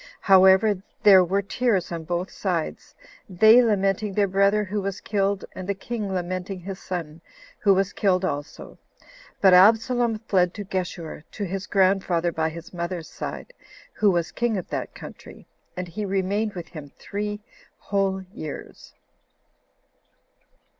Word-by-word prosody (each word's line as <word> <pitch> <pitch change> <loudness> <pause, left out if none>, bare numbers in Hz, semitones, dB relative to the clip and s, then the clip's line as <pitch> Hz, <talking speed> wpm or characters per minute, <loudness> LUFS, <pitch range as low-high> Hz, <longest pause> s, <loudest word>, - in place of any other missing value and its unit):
However, 190 +1 +5 0.2
their 195 -3 +8
were 195 +3 0
tears 200 -3 0
on 165 -1 -5
both 175 +3 -3
sides; 175 -5 -3 0.3
they 220 +6 +6
lamenting 200 -2 +1
their 205 -1 +3
brother 200 +2 +2
who 205 +1 -3
was 195 -1 -4
killed, 200 -1 -1
and 185 +1 -7
the 200 - 0
king 210 0 -5
lamenting 185 +1 -3
his 190 +1 -7
son, 165 -3 -6 0.4
who 200 -2 +4
was 195 +1 0
killed 190 -2 +1
also; 145 -3 -6 0.6
but 190 -2 +6
Absalom 225 +4 +4
fled 185 -5 +1
to 210 - -5
Geshur, 175 -5 -4
to 205 - -5
his 195 +1 -4
grandfather 185 -3 +2
by 160 0 -1
his 170 +2 -10
mother's 170 -1 -5
side, - - -7 0.4
who 210 - +3
was 170 -3 0
king 235 -3 -1
of 185 - -5
that - - -4
country, - - -12 0.3
and 180 0 -4
he 210 +6 -5
remained 200 +2 -1
with 175 -2 -7
him 150 -4 -10
three 210 +1 -4 0.4
whole 195 -1 -1
years. 155 -8 -9
190 Hz, 145 wpm, -24 LUFS, 180-205 Hz, 0.6 s, their